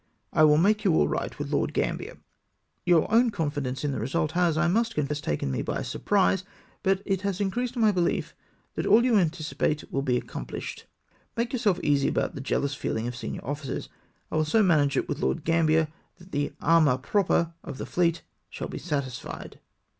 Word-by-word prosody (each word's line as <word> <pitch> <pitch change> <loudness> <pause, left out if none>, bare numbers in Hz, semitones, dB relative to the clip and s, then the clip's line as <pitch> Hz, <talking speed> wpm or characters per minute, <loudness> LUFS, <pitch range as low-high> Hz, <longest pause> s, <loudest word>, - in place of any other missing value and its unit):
I 155 - +5
will 150 0 +5
make 210 +6 +3
you 185 -6 +3
all 75 - +4
right - - -3
with - - -5
Lord - - 0
Gambler. - - -2 0.7
Your 170 -3 +5
own 235 +1 +5
confidence 145 - -3
in 145 - 0
the 130 - -3
result 150 +7 -1
has, 170 -2 +2
I 170 +2 +3
must 230 +5 +1
confess, 150 0 -1
taken 75 - -2
me - - -1
by - - -2
surprise, 195 -2 +1 0.4
but 195 0 +1
it 195 -2 0
has 200 -2 -2
increased 240 +5 -1
my 220 -2 +4
behef 180 -3 0 0.4
that - - -2
all 235 +3 +6
you 245 -3 +3
anticipate 160 -3 -1
will 135 - +1
be 125 -3 +1
accompHshed. - - -7 0.5
Make 235 +2 -1
yourself 210 -8 +1
easy 140 -2 +3
about - - 0
the 140 - -6
jealous 140 +1 -1
feehng 115 -3 -2
of 120 - -4
senior 120 -2 -6
officers; 145 0 -4 0.4
I - - 0
will 155 - +2
so 215 +8 +3
manage 145 -7 +3
it - - 0
with - - -3
Lord 65 - 0
Gambler 160 -1 +3 0.3
that 180 +1 -17
the 145 0 -1
amour 155 -5 +4
propre 170 +3 +1
of 130 - -7
the - - -5
fleet 170 -2 +1 0.3
shall - - -6
be - - -5
satisfied." 140 -7 -5
165 Hz, 190 wpm, -27 LUFS, 145-195 Hz, 0.7 s, all